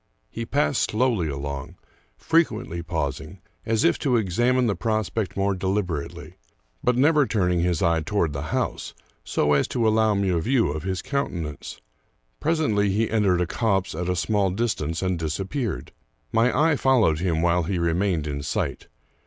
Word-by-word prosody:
He 115 0 -5
passed 145 -1 +1
slowly 110 -6 +1
along, 70 -1 -5 0.4
frequently 160 - 0
pausing, 80 +1 -4 0.3
as 110 -1 +1
if 85 - +3
to 125 -4 +2
ex 95 -3 -2
amine 125 +1 +3
the 105 -4 +1
prospect 110 +1 -2
more 100 0 +1
deliberately, 95 -5 -3 0.5
but 125 0 +2
never 145 +1 +4
turning 90 -5 +1
his 85 -2 0
eye 85 -1 +2
toward 85 -3 0
the 70 - -4
house, - - -2 0.3
so 75 0 +1
as 70 - +2
to 115 -3 0
allow 110 -1 +3
me 100 -1 +1
a 85 -2 +1
view 115 - +1
of 75 +1 -4
his 95 0 -3
countenance. 85 - -4 0.6
Presently 145 -11 +1
he 110 +4 0
entered 100 -5 +2
a - - +2
copse 95 0 0
at 90 +3 -3
a 90 - +1
small 100 +2 +1
dis 110 +4 0
tance, 80 +4 -4
and 95 -2 0
disappeared. 95 - -3 0.4
My 115 +2 +3 0.2
eye 150 - +1
followed 115 - +3
him 85 -2 0
while 85 +1 +3
he 90 +3 -2
remained 85 -1 0
in 70 -1 -3
sight. 75 - -3
95 Hz, 170 wpm, -24 LUFS, 85-115 Hz, 0.6 s, never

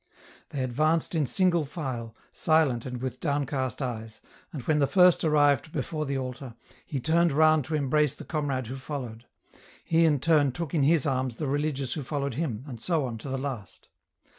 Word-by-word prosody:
They 135 -3 -3
advanced 155 +8 +1
in 155 -5 +1
single 180 -1 +2
file, 130 -7 -5 0.2
silent 150 -7 +2
and 125 0 -6
with 130 - -4
downcast 140 -4 -1
eyes, 115 -3 -5 0.3
and 140 -6 -6
when 150 +2 +2
the 140 - +3
first 180 0 +5
arrived 145 -2 +3
before 155 +1 -3
the 140 0 -1
altar, 130 -1 -6 0.3
he 140 - -3
turned 165 +5 +2
round 155 0 +4
to 160 - -2
embrace 150 0 +1
the - - -10
comrade 140 -5 -2
who 130 +4 -6
followed; 125 -4 -6 0.6
he 165 0 +3
in 150 -3 +3
turn 145 -3 +3
took 160 +1 -5
in 160 - +2
his 150 +1 +3
arms 130 -3 -1
the 150 - -4
religious 140 -2 -1
who 155 - -4
followed 140 0 -3
him, 130 -5 -3
and 120 -5 -8
so 165 -6 0
on 115 -3 -5
to 135 - -7
the 135 - -2
last. 130 -8 -6
140 Hz, 190 wpm, -27 LUFS, 130-155 Hz, 0.6 s, first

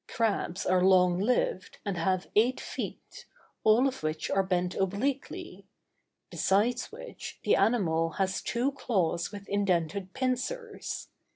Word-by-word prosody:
Crabs 205 -5 -1
are 180 0 +3
long 180 -1 +5
lived, 200 -3 0
and 200 -2 -1
have 180 +2 0
eight 240 +5 +4
feet, - - -7 0.4
all 230 +5 +5
of 265 - -4
which 155 0 -2
are 195 - +3
bent 180 -1 0
obliquely; 205 +9 -2 0.6
besides 230 +6 +1
which, - - -9
the - - +4
animal 165 -8 +2
has 190 -1 0
two 245 +4 0
claws 185 -11 0
with 200 -1 -9
indented 190 -2 0
pincers. 270 - -3
200 Hz, 125 wpm, -29 LUFS, 180-245 Hz, 0.6 s, long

